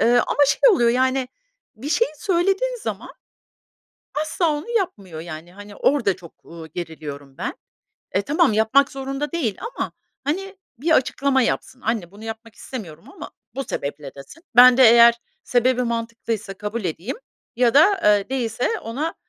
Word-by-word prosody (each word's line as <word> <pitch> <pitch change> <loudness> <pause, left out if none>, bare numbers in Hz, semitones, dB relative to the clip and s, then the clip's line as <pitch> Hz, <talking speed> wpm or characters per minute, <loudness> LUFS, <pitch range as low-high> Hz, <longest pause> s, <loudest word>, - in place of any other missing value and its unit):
Eee, - - +3 0.2
ama 290 - +3
şey - - +5
oluyor, 240 - +4
yani, 260 +1 +1 0.5
bir 255 +7 -6
şeyi 465 +9 +2
söylediğin 390 +6 +1
zaman - - -5 1.1
asla 310 +1 0
onu 295 +9 -6
yapmıyor. 205 - -2
Yani, 165 +1 -9
hani, 205 +1 -12
orada 235 -8 +2
çok, 170 -2 -16
ııı, 165 -1 -10
geriliyorum 150 -4 -8
ben. - - -3 0.6
E, 195 - +1
tamam 285 0 +2
yapmak 220 +6 +3
zorunda 275 +2 -4
değil 260 - -1 0.2
ama, - - -3 0.3
hani, 390 +7 -3 0.2
bir 310 +7 -1
açıklama 265 0 +1
yapsın, 255 +1 -2
"Anne 220 -7 -2
bunu 205 +3 -13
yapmak 225 0 -8
istemiyorum 170 - -9
ama - - -9 0.2
bu 275 - -3
sebeple" 140 - -5
desin. 140 - -13
Ben 250 0 +9
de 265 - +6
eğer 235 0 +7 0.2
sebebi 250 +1 +2
mantıklıysa 230 -3 -3
kabul 210 +2 -5
edeyim 175 - -4 0.4
ya 245 0 +3
da, 380 +7 +5
eee, 205 -1 +4
değilse 250 - -1
ona, 285 +9 -4
235 Hz, 150 wpm, -22 LUFS, 200-280 Hz, 1.1 s, Ben